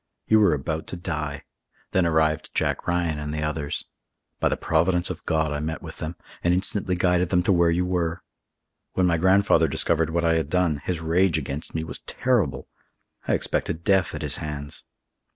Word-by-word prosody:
You 110 - +5
were 100 -7 +4
about 80 +3 -4
to - - -4
die. 80 -5 -4 0.5
Then 95 -2 +3
arrived 80 -1 +1
Jack - - -1
Ryan 85 -3 0
and 75 0 -4
the 75 0 -2
others. 75 -1 -2 0.5
By - - +2
the - - -1
providence 85 +2 +1
of - - -8
God 80 -1 +1
I 75 - -2
met 80 +2 -4
with - - -9
them, 80 +2 -4 0.3
and 85 +1 +3
instantly 95 0 -1
guided 90 -1 +2
them 90 -1 +2
to 95 - +3
where 85 -1 +4
you 85 +2 +1
were. 85 -2 -1 0.7
When 95 - +2
my 85 -2 +3
grandfather 95 +4 +4
discovered 80 -1 +1
what 85 +1 0
I 80 0 +3
had 80 -3 -2
done, 90 -3 +2
his 80 +3 -3
rage 85 +1 +2
against 75 +1 -5
me 80 - -1
was 80 - -4
terrible. 120 - 0 0.6
I - - +2
expected 85 0 -1
death 95 -2 +2
at - - -5
his - - +1
hands. 75 -1 -6
85 Hz, 190 wpm, -25 LUFS, 80-90 Hz, 0.7 s, You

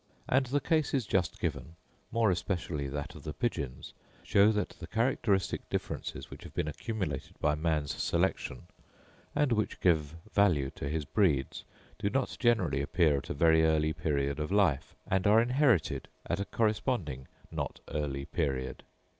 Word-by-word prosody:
And 130 0 +3
the 140 +4 +1
cases 145 -6 +1
just 95 -5 0
given, 75 +7 -3 0.4
more 115 -3 +3
especially 85 -5 -2
that 70 +1 -5
of - - -11
the - - -5
pigeons, 65 0 -3 0.3
show 100 +2 +5
that 105 -1 0
the 85 - -7
characteristic 110 -3 0
differences - - -4
which - - -9
have - - -11
been - - 0
accumulated 80 - -4
by 75 -1 +2
man's 75 -2 0
selection, 65 - 0 0.7
and 145 -3 +2
which 110 -2 0
give 80 -4 +2 0.2
value 85 -10 +3
to 70 - -5
his 75 0 -2
breeds, 75 - +1 0.3
do 100 -1 0
not 130 +3 -1
generally 120 - +2
appear 75 0 +3
at - - -11
a - - -2
very 80 +1 +5
early 80 -1 +3
period 70 -2 -1
of 75 +3 -3
life, 95 -9 +2
and 95 +1 +1
are 105 +2 +7
inherited 125 - +2 0.2
at 85 - -1
a 100 - -1
corresponding 105 - -1 0.2
not - - -4
early 70 -2 -2
period. 70 -7 -2
85 Hz, 155 wpm, -31 LUFS, 75-110 Hz, 0.7 s, are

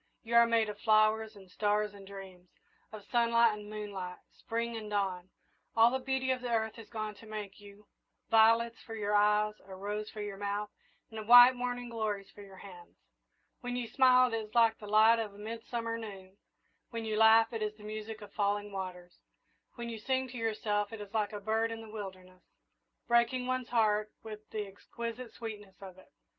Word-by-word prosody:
You 230 0 -6
are 235 0 +7
made 230 -1 +2
of 205 -1 -7
flowers 215 0 +3
and 195 -2 -14
stars 210 +2 0
and 200 -1 -13
dreams 190 -2 -11 0.4
of 215 -2 -9
sunlight 235 -1 +3
and 210 0 -9
moonlight, 200 -4 -6 0.2
Spring 230 0 -3
and 215 -2 -6
dawn. 190 -3 -2 0.5
All 230 +1 +6
the 260 - -1
beauty 265 0 0
of 255 -1 -1
the 250 - -4
earth 220 -1 0
has 225 -2 -11
gone 215 -2 -4
to 220 +2 -15
make 210 -2 -7
you 205 0 -15 0.4
violets 230 +1 +4
for 225 - -8
your 210 -1 -2
eyes, 210 +1 +3
a 190 -1 -10
rose 210 +2 -4
for 210 - -6
your 200 -1 -6
mouth, 205 +1 -3 0.4
and 220 -1 -7
white 245 +1 +10
morning 245 0 -3
glories 215 -4 -3
for 205 - -13
your 195 -1 -13
hands. 180 -3 -13 0.6
When 245 0 -4
you 245 -1 -3
smile 255 -1 +5
it - - +1
is 215 +1 -7
like 230 -1 +4
the 210 - -9
light 220 +2 +5
of 210 -3 -4
a - - -14
midsummer 230 +1 -4
noon; 195 -3 -10 0.5
when 230 -1 -5
you 215 -1 -2
laugh 225 +1 +6
it 225 - -3
is 210 0 -2
the 210 - -15
music 215 +1 -6
of 205 -1 -12
falling 205 0 -1
waters; 180 -2 -7 0.6
when 235 -1 -6
you 225 -1 -6
sing 260 +3 -1
to 245 - -8
yourself 210 -2 -1
it 225 - -7
is 205 -1 -9
like 215 -2 0
a 210 - -5
bird 220 +2 0
in 225 - -5
the 225 - -11
wilderness, 185 -3 -9 0.7
breaking 235 +1 +2
one's 255 -1 -2
heart 215 -2 +2
with 215 -1 -9
the 215 -1 -3
exquisite 230 +4 -7
sweetness 210 -4 -9
of 190 -1 -11
it. - - -20
215 Hz, 200 wpm, -32 LUFS, 205-230 Hz, 0.7 s, white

